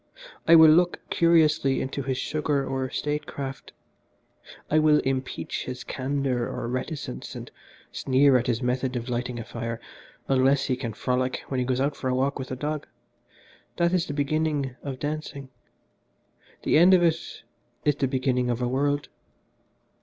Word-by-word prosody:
I 165 - +8
will 160 -1 +9
look 175 +2 +3
curiously 155 -5 +3
into 135 +1 -3
his 130 -1 -2
sugar 145 -2 -1
or 130 -1 -2
statecraft. 140 -2 -4 1.0
I 155 - +3
will 155 -1 +5
impeach 130 0 -3
his 125 -1 -6
candour 135 -2 -1
or - - -4
reticence, 130 +5 -5
and - - -8 0.4
sneer 135 +1 +3
at 125 -1 +2
his 120 0 0
method 125 +1 -1
of 120 +1 -4
lighting 125 0 -2
a 115 - -4
fire 115 0 -5 0.5
unless 135 +1 +3
he 130 - 0
can 120 -3 -5
frolic 130 +3 -1
when 130 - -1
he 125 - -1
goes 130 -1 0
out 140 +2 0
for 130 - -3
a 125 - +1
walk 135 +2 0
with 130 - -5
a 130 - -3
dog 150 +2 -3 0.9
that 170 +1 +2
is 180 -3 +1
the 145 - -4
beginning 145 -2 0
of 135 -2 -5
dancing: 145 -2 -5 1.1
the - - +4
end 185 +3 +7
of 175 - +3
it 165 -1 -1 0.4
is 150 -2 +3
the 140 - +1
beginning 130 -1 0
of 120 -1 -1
a 125 - 0
world. 145 +3 0
135 Hz, 165 wpm, -26 LUFS, 130-150 Hz, 1.1 s, will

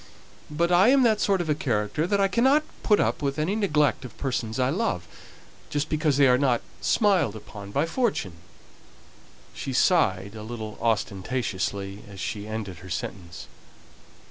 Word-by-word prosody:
But 170 +4 0
I 180 +4 +6
am 265 +1 +5
that 220 -3 +3
sort 195 -2 +2
of 170 - -4
a 150 - +3
character 125 +1 -1
that 200 +1 +1
I 195 - +4
cannot 265 +9 +3 0.2
put 210 - +3
up - - 0
with 140 -1 -1
any 160 +7 0
neglect 150 -11 +1
of 125 -3 -10
persons 120 -5 -2
I 130 +1 +2
love, 155 - -1 0.6
just 145 0 -2
because 150 -2 +1
they 140 -1 +6
are 125 0 +4
not 130 -4 +2 0.2
smiled 195 - +2
upon 100 -1 -10
by 140 +9 +1
fortune." 165 - -1 1.2
She 135 - -5
sighed 100 - +2
a 110 - -8
little 110 -1 -7
ostentatiously 100 -3 -2
as 100 -1 -11
she 105 +1 -4
ended 105 -5 -5
her 90 - -11
sentence. 85 -1 -6
130 Hz, 165 wpm, -26 LUFS, 105-175 Hz, 1.2 s, I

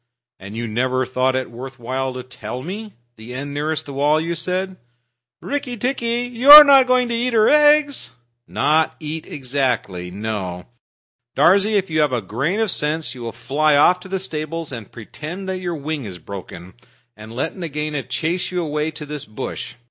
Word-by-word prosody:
"And 100 +2 -9
you 115 +1 -3
never 130 +3 0
thought 130 +1 0
it 130 -2 -3
worth 130 +2 -9
while 130 +2 -3
to 125 - -6
tell 125 0 -8
me? 205 +5 -7 0.2
The 115 +3 -9
end 140 +2 -5
nearest 150 +2 -2
the 140 - -8
wall, 145 +3 +2
you 165 +2 -2
said?" 185 +3 -3 0.7
"Rikki 280 -4 -3
tikki, 240 0 -1
you 245 +2 -1
are 300 +1 +14
not 275 -3 +6
going 255 -1 +3
to - - -1
eat 240 +1 -1
her 220 -1 +4
eggs?" 295 - +4 0.4
"Not 155 +1 +1
eat 155 +1 -5
exactly; 125 -10 -2
no. 95 -3 -5 0.7
Darzee, 200 +8 +4
if 195 -4 -2
you 155 - +1
have 150 -3 +1
a 125 - +1
grain 130 - -2
of 220 -4 +1
sense 150 -3 -2
you 125 - -11
will 115 -1 -4
fly 140 +6 +1
off 180 +5 +5
to 185 - -12
the 190 +1 -2
stables 165 -3 -5
and 115 -6 -8
pretend 155 - -8
that 190 -1 -3
your 175 -2 -3
wing 150 -2 -4
is 95 -4 -7
broken, 90 0 -10 0.4
and 110 +1 -11
let 130 +7 -3
Nagaina 150 -4 -3
chase 170 +7 -2
you 180 -1 -1
away 150 0 -2
to 150 -1 -8
this 150 -1 -6
bush. 110 +5 -6
150 Hz, 185 wpm, -20 LUFS, 125-185 Hz, 0.7 s, are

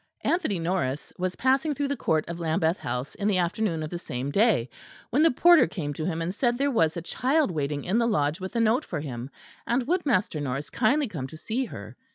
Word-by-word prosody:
Anthony 335 - +1
Norris 165 -5 -2
was 185 0 -1
passing 270 +4 +2
through 280 +1 -1
the 280 - 0
court 160 - 0
of 170 0 -5
Lambeth 160 +1 +1
House 125 +3 -4
in 205 - -2
the 200 -3 +2
afternoon 175 -2 0
of 155 - -5
the 175 - -4
same 130 -2 -4
day, 200 - +3 0.4
when 270 +6 +3
the 325 - +6
porter 345 +4 +6
came 150 -8 -4
to 155 +2 -4
him 165 -2 -2
and 175 +3 -2
said 240 +2 +1
there 280 +2 +1
was 165 -9 +2
a 170 - -4
child 275 - +1
waiting 145 -3 -2
in 205 +6 +1
the 235 - +2
Lodge 150 -5 +1
with 190 +4 -6
a - - +2
note 230 +5 +3
for 170 - -4
him; 130 -3 -6 0.4
and 240 +1 +1
would 350 +5 +1
Master 205 - +1
Norris 140 +1 -3
kindly 280 +6 +2
come 150 - -5
to 155 - -11
see 235 +10 -2
her. - - -9
185 Hz, 230 wpm, -26 LUFS, 155-245 Hz, 0.4 s, the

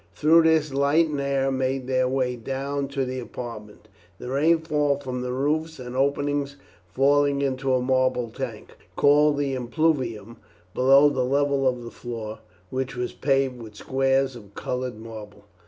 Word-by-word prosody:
Through 160 +2 +5
this 155 -3 +3
light 145 +4 +3
and 145 -2 -2
air 135 -1 0
made 130 0 -1
their 130 0 +1
way 130 -1 0
down 135 +3 -3
to 135 -1 -2
the 130 0 -4
apartment, 110 -4 -8 0.3
the 125 - -7
rainfall 150 -1 +2
from 130 -3 -5
the 125 0 -3
roofs 155 +5 -1
and 125 -1 -8
opening 140 +1 0 0.4
falling 140 +4 +2
into 130 -1 0
a 125 - 0
marble 130 -2 +1
tank, - - -6 0.2
called 145 0 +4
the 140 -1 -1
impluvium, 125 -5 -1 0.4
below 135 +3 +6
the 130 -2 0
level 140 +1 +1
of 125 -1 -1
the 115 - -8
floor, 110 -3 -7 0.3
which 130 -1 -3
was 125 0 -3
paved 135 -3 0
with 110 -2 -11
squares 135 +2 0
of 100 -4 -13
coloured 125 -2 -4
marble. 110 -2 -10
135 Hz, 155 wpm, -24 LUFS, 125-140 Hz, 0.4 s, below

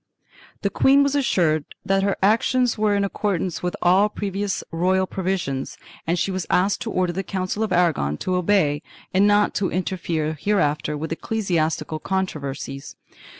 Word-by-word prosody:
The - - +1
queen 275 +1 +5
was 280 0 +1
assured 175 - +2 0.2
that 195 0 +2
her 200 0 0
action 225 +5 +3
was 245 -3 +1 0.2
in 200 - +1
accordance 190 -3 -2
with 180 0 -2
all 190 +4 +4
previous 200 -1 -3
royal 185 +3 +2
pro 190 0 -6
visions 170 -8 -2 0.3
and 170 +2 +1
she 195 - 0
was 185 -2 -3
asked 195 +3 +2
to - - -3
order 180 -1 0
the 190 - -2
Council 190 +2 -3
of 220 - -1
Aragon 160 - +2
to 185 - -2
obey 180 -5 +2 0.3
and 195 +2 +4
not 205 0 +3
to 195 - 0
interfere 165 -3 -2
hereafter 150 -7 0
with 160 +2 -5
ecclesiastical 165 -5 -1
controversies. 145 -7 -4
185 Hz, 160 wpm, -23 LUFS, 165-200 Hz, 0.3 s, queen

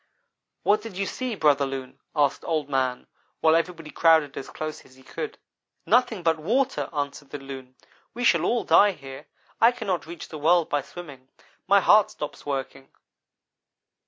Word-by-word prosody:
"'What 210 +1 +3
did 215 -4 -9
you 195 - 0
see, 250 +2 -3
Brother 145 -5 +3
Loon?' 135 -1 -7 0.2
asked 145 -2 +1
Old 155 -4 -1
man, 130 -2 -1 0.3
while 160 0 +4
everybody 165 -2 -2
crowded 160 -4 +4
as 135 - -6
close 155 0 -6
as 130 - -20
he 130 - -19
could. 440 - -6 0.5
"'Nothing 230 -7 +2
but 160 -1 +2
water,' 200 - 0
answered 145 -2 -4
the 145 - -5
Loon, 135 -2 -10 0.4
'we 245 - -4
shall - - +4
all 240 0 +1
die 205 -1 +5
here, 135 -4 -11 0.3
I 230 +2 +7
cannot 190 -9 -3
reach 170 -1 -8
the 155 - -7
world 165 +2 +3
by 145 - +1
swimming. 140 -4 -11 0.4
My 200 +1 +5
heart 215 +1 +5
stops 150 -8 -8
working.' 135 -1 -4
155 Hz, 165 wpm, -25 LUFS, 140-195 Hz, 0.5 s, I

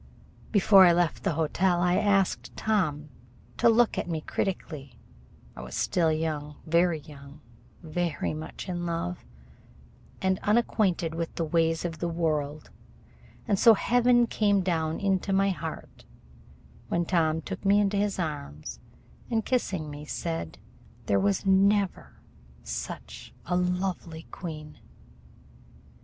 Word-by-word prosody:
Before 200 -2 +7
I 170 - +6
left 170 -1 +1
the - - 0
hotel 175 +3 +1
I 180 0 +2
asked 195 -2 +1
Tom 155 -9 0 0.5
to - - +5
look 230 0 +3
at - - -4
me 160 -2 -2
critically. 155 -7 -4 0.6
I - - -8
was 60 0 -8
still 165 -3 +1
young 155 -2 -2
very 170 0 +2
young, 140 -1 -13 0.4
very 165 -1 -2
much 155 +4 -7
in 175 -1 -3
love, 170 +1 -3 1.0
and 190 0 +1
unacquainted 205 -6 +1
with 165 0 -4
the 165 - -1
ways 165 +1 +1
of 165 -2 -4
the 175 - -1
world, 155 -3 -2 0.8
and 200 -2 +1
so 230 -1 +8
heaven 240 +2 +3
came 205 -3 +2
down 160 -3 -1
into 195 -1 0
my 195 +1 +3
heart 165 -3 -7 0.8
when 170 0 0
Tom 160 -2 +1
took 185 +4 -7
me 200 +1 +4
into 205 0 +1
his 205 0 0
arms 75 - -5 0.5
and, 225 -2 0
kissing 190 - -1
me, 145 0 -8
said: 160 - -4 0.5
"There 100 -1 +2
was 100 - 0
never 195 0 +2 0.4
such - - -7
a 180 - -1
lovely 180 -2 -2
queen." 155 -4 -8
175 Hz, 130 wpm, -27 LUFS, 155-195 Hz, 1.0 s, so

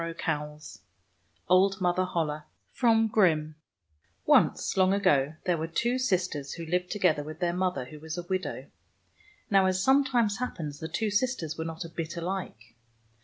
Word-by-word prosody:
147 150 - -5 0.3
] - - -41
OLD 190 +2 +4
MOTHER 185 0 +1
HOLLE 155 -4 -2 0.4
O 225 -2 +4 1.2
NCE, - - +3
long 190 0 +4
ago, 145 -6 +2
there 175 -3 +1
were 160 - -2
two 235 +10 0
sisters 180 - -1
who 170 - -7
lived 180 +2 -1
together 180 -8 +1
with 155 +2 -9
their 175 -1 0
mother, 180 -7 -1
who 150 +4 -11
was 160 +2 -6
a 175 - -4
widow. 185 +1 -3 0.9
Now, 195 -1 +5
as 185 0 0
sometimes 255 -5 +3
happens, 155 - -4
the 160 - -5
two 210 +6 -2
sis 250 +5 +1
ters 160 -7 -5
were 160 - -4
not 165 +1 -5
a - - -8
bit 165 0 -5
alike. 170 - -5
175 Hz, 165 wpm, -28 LUFS, 160-195 Hz, 1.2 s, Now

